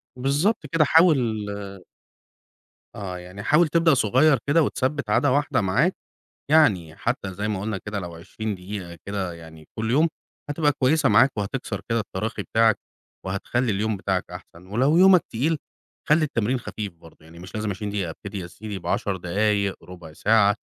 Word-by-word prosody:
بالضبط 145 - 0
كده، 160 -2 +4
حاول 160 -7 +5 1.7
آه، 95 -3 -5
يعني 90 +3 -9
حاول 155 - +4
تبدأ 165 0 +3
صغيّر 135 +4 +4
كده 160 +3 +4
وتثبِّت 135 -3 -1
عادة 135 +6 +3
واحدة 145 -4 +1
معاك، 125 - +2 0.6
يعني 95 - +3
حتى 115 -3 -2
زي 105 +3 -3
ما 105 -3 -2
قُلنا 105 0 -3
كده 105 +1 -5
لو 90 -3 -6
20 105 +6 -5
دقيقة 90 -2 -7
كده 100 -3 -3
يعني 80 -2 -13
كلّ 110 +1 -1
يوم 155 +7 +4 0.4
هتبقى 145 0 +2
كويسة 140 +2 +2
معاك 135 - +5
وهتكسَر 100 0 -3
كده 115 0 +1
التراخي 105 +1 -4
بتاعك، 110 -1 +3 0.5
وهتخلّي 110 +5 -1
اليوم 105 +2 -1
بتاعك 95 -1 -1
أحسَن. 90 0 -12
ولو 130 - +2
يومك 185 0 +7
تقيل 150 +8 0 0.5
خلّي 155 +1 +4
التمرين 125 -2 0
خفيف 105 -4 -6
برضه، 85 -1 -18
يعني 80 +2 -15
مش 90 +3 -11
لازم 110 -1 -2
20 100 +2 -4
دقيقة، 100 -5 -2
ابتدي 100 +4 -7
يا 90 - -5
سيدي 100 +3 -7
ب10 95 +2 -1
دقايق، 100 +2 0
رُبع 85 -3 -11
ساعة، 105 +3 +3
105 Hz, 165 wpm, -24 LUFS, 95-140 Hz, 1.7 s, يومك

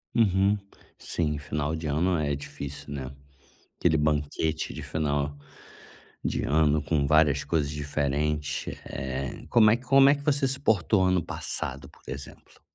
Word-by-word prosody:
Uhum, 100 -2 +3 0.4
sim, 75 -3 -2
final 75 +1 -2
de 80 0 -6
ano 85 +5 +1
é 70 -2 0
difícil, 70 0 -8
né. 65 -2 -5 0.7
Aquele 80 -2 +3
banquete 75 +1 -1
de - - -6
final 75 -2 -1 0.9
de - - -1
ano 75 0 +3
com 75 -1 +1
várias 75 -1 +4
coisas 75 -4 0
diferentes, 75 0 -2
eh, 65 0 -5
como 110 -3 +6
é 115 - +4
que 125 - -14
como 135 0 +6
é 140 - +6
que 145 - -10
você 140 -2 +2
se 135 - -2
portou 105 - +3
ano 95 -1 +2
passado, 70 -2 -4
por - - -21
exemplo? 70 - -9
75 Hz, 150 wpm, -27 LUFS, 70-95 Hz, 0.9 s, como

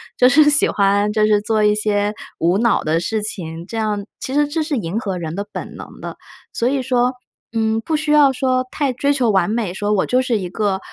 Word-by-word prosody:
就 250 - +5
是 295 +3 +5
喜 295 0 +4
欢 200 +1 +2
就 215 0 +2
是 210 -1 +3
做 215 0 0
一 210 0 +4
些 210 -1 0 0.2
无 175 +4 +1
脑 235 -2 +2
的 155 +2 +1
事 210 +5 -2
情， 165 -5 -4
这 225 - -7
样 210 -2 -2
其 - - -5
实 295 +2 +2
这 315 +3 -2
是 305 -1 -2
迎 205 -3 -2
合 195 -5 -3
人 160 -2 -5
的 200 - -3
本 - - -7
能 - - -11
的。 - - -7 0.4
所 235 - 0
以 270 -1 -1
说， 250 0 +1 0.4
嗯， 225 -1 0
不 315 +7 -2
需 300 0 -1
要 295 -2 +6
说 255 -1 0
太 280 -2 -1
追 280 +3 0
求 255 -6 +2
完 190 -2 +2
美， 215 -5 -2
说 205 +2 -2
我 205 -3 +2
就 250 +1 +2
是 250 -3 0
一 190 -3 -4
个， 200 -1 -1
220 Hz, 255 characters per minute, -19 LUFS, 205-255 Hz, 0.4 s, 要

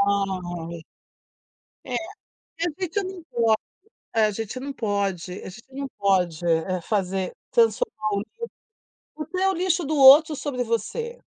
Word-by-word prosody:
Ai 175 -4 -2 1.0
Eh, 250 - -3 0.6
a 345 - +1
gente 370 +3 -1
não 370 -2 -7
pode 235 -8 -3 0.7
eh, 220 -1 +5
a - - +1
gente 225 +4 -5
não 280 +2 -4
pode 200 -7 -1
a 190 - -7
gente 235 +7 -13
não 275 +1 -4
pode, 180 -4 +1
eh, 170 +2 +1
fazer 190 -1 -1 0.2
transformar 455 - +2
o 200 - +1
lixo. 215 - -10 0.8
O 305 - -5
teu 380 +1 +1
lixo 360 -1 +1
do 310 +2 -1
outro 290 +3 +8
sobre 265 -3 -2
você. 465 - -3
230 Hz, 145 wpm, -25 LUFS, 190-315 Hz, 1.0 s, outro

